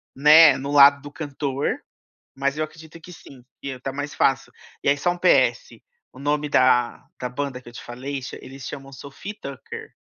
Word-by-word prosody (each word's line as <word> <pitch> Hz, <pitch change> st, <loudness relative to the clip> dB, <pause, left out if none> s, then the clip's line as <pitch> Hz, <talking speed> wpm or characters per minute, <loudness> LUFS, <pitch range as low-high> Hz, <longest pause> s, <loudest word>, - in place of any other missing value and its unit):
né, 150 Hz, 0 st, +7 dB
no 140 Hz, +2 st, -5 dB
lado 140 Hz, 0 st, +7 dB
do 145 Hz, -, -10 dB
cantor, 140 Hz, -2 st, -3 dB, 0.6 s
mas 140 Hz, +1 st, -1 dB
eu 155 Hz, -, -1 dB
acredito 160 Hz, +1 st, -11 dB
que 180 Hz, -, -12 dB
sim, 135 Hz, -5 st, -15 dB, 0.2 s
que 135 Hz, -2 st, -6 dB
tá 135 Hz, -, -4 dB
mais 145 Hz, +1 st, -5 dB
fácil. 135 Hz, -3 st, +1 dB, 0.3 s
E -, -, +2 dB
aí 145 Hz, -, +3 dB
só 175 Hz, +5 st, +1 dB
um 175 Hz, -, -5 dB
PS, -, -, +2 dB, 0.3 s
o -, -, -18 dB
nome 145 Hz, +1 st, -1 dB
da 125 Hz, -2 st, +2 dB, 0.2 s
da 125 Hz, -, -3 dB
banda 130 Hz, 0 st, -4 dB
que 120 Hz, -, -13 dB
eu 120 Hz, -, -17 dB
te -, -, -9 dB
falei 135 Hz, +3 st, -6 dB
cha 130 Hz, -, -8 dB
eles 135 Hz, 0 st, -10 dB
chamam 135 Hz, -1 st, -8 dB
Sophie 140 Hz, +8 st, -9 dB
e -, -, -11 dB
Tucker, 140 Hz, -1 st, -9 dB
140 Hz, 205 wpm, -23 LUFS, 135-150 Hz, 0.6 s, né